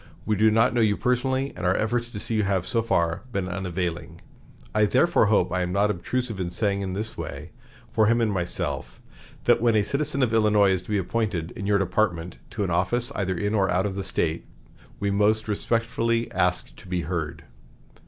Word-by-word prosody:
We 110 - +1
do 110 +2 +4
not 115 +3 +3
know 120 - +2
you 105 -2 +3
personally, 130 +2 0
and - - -7
our 90 +1 +2
efforts 120 +2 -1
to 105 - -5
see 115 - -4
you 110 - +2
have, 95 -3 0
so 115 - +1
far, 85 -7 0
been 100 -4 -2
unavailing. 90 -2 -4 0.5
I 105 0 +4
therefore 130 +2 +3
hope 95 -4 +2
I 90 0 0
am 90 0 -1
not 100 +2 +2
obtrusive 115 +3 -3
in 90 -2 -2
saying 100 +2 -1
in 95 -1 -3
this 110 +3 -4
way, 75 -1 -7 0.4
for 110 -1 +3
him 115 +2 +3
and 115 -2 +2
myself, 90 -2 -3 0.4
that - - +4
when 115 -1 +3
a 105 - +4
citizen 140 +3 0
of 115 -3 +1
Illinois 105 -3 +4
is 95 -2 +1
to - - -16
be 105 - +1
appointed, 95 -3 -1
in 100 -4 -6
your 100 0 +4
department, 90 -3 -1
to 105 - -3
an 95 - -1
office, 115 +8 0
either 95 -3 -1
in 105 +2 -1
or 100 -3 +2
out 90 +2 +1
of 100 - -2
the 100 0 -4
State, 85 -3 -1 0.5
we 100 0 0
most 105 +2 +2
respectfully 115 +2 0
ask 90 0 0
to - - -14
be 90 -1 -1
heard." 80 -1 -4
100 Hz, 210 wpm, -25 LUFS, 90-115 Hz, 0.5 s, do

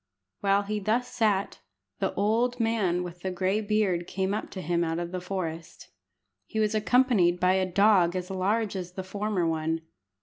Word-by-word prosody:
While 200 0 +2
he 210 +1 -2
thus 225 +5 0
sat, 210 -4 0 0.4
the - - 0
old 235 +5 +1
man 210 -6 +1
with 175 0 -8
the 190 - -2
gray 185 +3 0
beard 205 -5 0
came 190 +1 -1
up 215 - -3
to 185 - -7
him 170 +2 +1
out 165 0 -1
of 175 0 -4
the 185 -1 -4
forest. 170 -3 -5 0.6
He 220 - -3
was 215 0 +2
accompanied 215 -5 +3
by 185 +1 +3
a 190 0 +1
dog 195 -3 +4
as 180 +1 -4
large 200 +3 0
as 180 -1 -5
the 190 - -5
former 200 -1 -1
one. 160 0 -1
190 Hz, 180 wpm, -27 LUFS, 175-215 Hz, 0.6 s, dog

